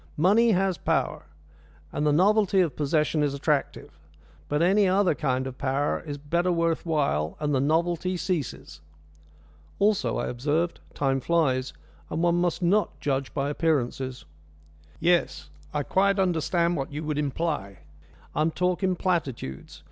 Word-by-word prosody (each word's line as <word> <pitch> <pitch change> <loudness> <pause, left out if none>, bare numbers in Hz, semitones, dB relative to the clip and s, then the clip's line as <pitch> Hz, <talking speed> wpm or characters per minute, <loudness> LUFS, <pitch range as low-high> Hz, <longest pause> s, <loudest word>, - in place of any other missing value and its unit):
Money 210 +8 +4
has 190 -2 +1
power, - - -1 0.6
and 150 - -1
the - - +4
novelty 200 +4 +3
of 170 -7 +1
possession 150 +1 +1
is 145 -1 0
attractive. 145 0 -2 0.5
But 150 +2 +1
any 195 +3 +4
other 185 -1 +3
kind 130 -3 -1
of 130 -1 -7
power 140 +2 0
is 145 -3 -6
better 170 +5 0
worth 170 0 0
while, 140 - 0
and 150 -1 -1
the 135 - +2
novelty 170 +5 0
ceases." 155 - -4 1.0
"Also," 205 0 +1
I - - -1
observed, 150 +8 -1 0.2
"time 135 -1 +1
flies, 130 -5 +1 0.4
and 165 - -2
one 175 0 +3
must 175 0 -1
not 200 +5 +1
judge 135 -1 -1
by 140 0 -1
appearances." 135 -5 -1 0.7
"Yes, 175 +1 +1 0.2
I 150 -1 -1
quite 195 +6 +2
understand 175 -1 +1
what 135 0 -4
you 150 +2 -5
would 150 -1 -2
imply. 145 - -3 0.5
I - - 0
am 155 - +3
talking 180 +2 0
platitudes. 140 - -3
160 Hz, 145 wpm, -26 LUFS, 140-180 Hz, 1.0 s, Money